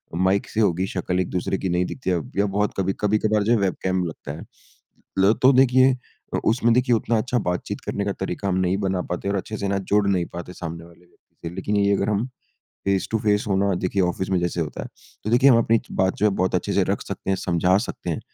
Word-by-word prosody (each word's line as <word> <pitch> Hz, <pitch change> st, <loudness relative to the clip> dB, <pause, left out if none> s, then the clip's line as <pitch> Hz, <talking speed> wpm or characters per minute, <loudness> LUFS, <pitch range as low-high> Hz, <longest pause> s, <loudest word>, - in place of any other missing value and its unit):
Mic 95 Hz, +3 st, +1 dB
से -, -, -3 dB
ही -, -, +5 dB
होगी, 95 Hz, +1 st, 0 dB
शक्ल 90 Hz, -1 st, -2 dB
एक 90 Hz, -, -1 dB
दूसरे 90 Hz, +1 st, -1 dB
की 95 Hz, -, -3 dB
नहीं 90 Hz, +1 st, +1 dB
दिखती 125 Hz, +1 st, -5 dB
है। 90 Hz, -, +2 dB
अब 75 Hz, -6 st, -7 dB
या 100 Hz, -, +3 dB
बहुत 105 Hz, +1 st, 0 dB
कभी 95 Hz, 0 st, 0 dB
कभी-कभार 105 Hz, 0 st, +2 dB
जो 110 Hz, -, +1 dB
है 120 Hz, -, +5 dB
वेबकैम 95 Hz, -1 st, 0 dB
लगता 80 Hz, -3 st, -6 dB
है। -, -, -9 dB, 0.7 s
ल 100 Hz, +3 st, +5 dB
तो 130 Hz, -, +7 dB
देखिए 130 Hz, 0 st, +5 dB, 0.4 s
उ -, -, +1 dB
उसमें 115 Hz, 0 st, +3 dB
देखिए 125 Hz, 0 st, +3 dB
उतना 115 Hz, +1 st, 0 dB
अच्छा 125 Hz, +3 st, 0 dB
बात-चीत 90 Hz, -4 st, -3 dB
करने 100 Hz, -, -3 dB
का 100 Hz, -, 0 dB
तरीका 95 Hz, +1 st, -3 dB
हम 95 Hz, -, +1 dB
नहीं 95 Hz, +1 st, +1 dB
बना 95 Hz, -2 st, -1 dB
पाते 90 Hz, +3 st, -3 dB
और 100 Hz, -, 0 dB
अच्छे 105 Hz, +3 st, -4 dB
से 100 Hz, -, -2 dB
ना 100 Hz, 0 st, 0 dB
जुड़ 105 Hz, -1 st, +4 dB
नहीं 95 Hz, -3 st, +1 dB
पाते 85 Hz, +1 st, -7 dB
सामने 85 Hz, -2 st, -6 dB
वाले 85 Hz, 0 st, -18 dB
व्यक्ति 85 Hz, -, -14 dB
से। -, -, -11 dB
लेकिन 100 Hz, +2 st, -2 dB
यही 100 Hz, 0 st, +3 dB
अगर 100 Hz, +1 st, 0 dB
हम 105 Hz, +2 st, 0 dB, 0.6 s
फ़ेस 100 Hz, -1 st, +1 dB
टू 110 Hz, -, +1 dB
फ़ेस 105 Hz, -1 st, +2 dB
हों 95 Hz, -, +2 dB
ना 100 Hz, 0 st, +2 dB
देखिए 95 Hz, +2 st, 0 dB
ऑफिस 90 Hz, +2 st, -1 dB
में 95 Hz, -, +2 dB
जैसे 85 Hz, 0 st, -1 dB
होता 75 Hz, -2 st, -4 dB
है -, -, -7 dB, 0.4 s
तो 110 Hz, -, -1 dB
देखिए 125 Hz, +4 st, +6 dB
हम 120 Hz, -, +6 dB
अपनी 115 Hz, -1 st, +3 dB
बात 95 Hz, 0 st, +1 dB
जो 105 Hz, -, +2 dB
है 105 Hz, -, +2 dB
बहुत 95 Hz, -, 0 dB
अच्छे -, -, -2 dB
से -, -, +3 dB
रख -, -, -1 dB
सकते 95 Hz, -, -5 dB
हैं, 95 Hz, -, +2 dB
समझा 90 Hz, +1 st, +2 dB
सकते -, -, -4 dB
हैं। -, -, -2 dB
95 Hz, 260 wpm, -23 LUFS, 90-105 Hz, 0.7 s, तो